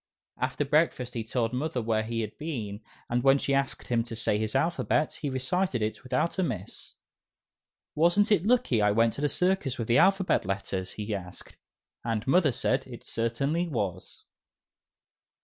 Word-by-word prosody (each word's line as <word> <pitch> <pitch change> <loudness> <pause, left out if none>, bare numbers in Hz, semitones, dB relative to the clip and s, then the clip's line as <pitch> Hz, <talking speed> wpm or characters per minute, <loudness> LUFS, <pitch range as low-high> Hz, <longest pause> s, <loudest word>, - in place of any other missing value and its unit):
After 130 +3 -1
breakfast 140 -4 +1
he 115 - -3
told 115 +1 -1
Mother 130 +1 -1
where 110 -1 0
he 115 +1 -2
had 110 -1 -5
been, 115 -10 -4 0.3
and 120 +1 0
when 135 +1 +5
she 140 - -1
asked 135 0 -1
him 120 -2 +2
to 115 -1 -7
say 105 -1 0
his 110 0 -2
alphabet, 165 -2 +1
he 145 - -1
recited 130 - 0
it 110 - -3
without 130 +8 -1
a - - +3
miss. 95 - -5 1.0
"Wasn't 175 +7 +3
it 200 -5 +4
lucky 220 - +2
I 105 - +4
went 115 +2 +3
to - - -6
the 145 - +2
circus 180 -8 0
with 115 - -3
the 120 - +4
"'Alphabet 195 -1 +3
Letters'?" 95 -1 -3
he 105 0 -4
asked, 90 -2 -8 0.5
and 115 -2 -2
Mother 150 +1 +4
said 130 +2 0
it 120 -2 -10
certainly 140 +9 -1
was. 105 - -4
125 Hz, 170 wpm, -28 LUFS, 110-155 Hz, 1.0 s, when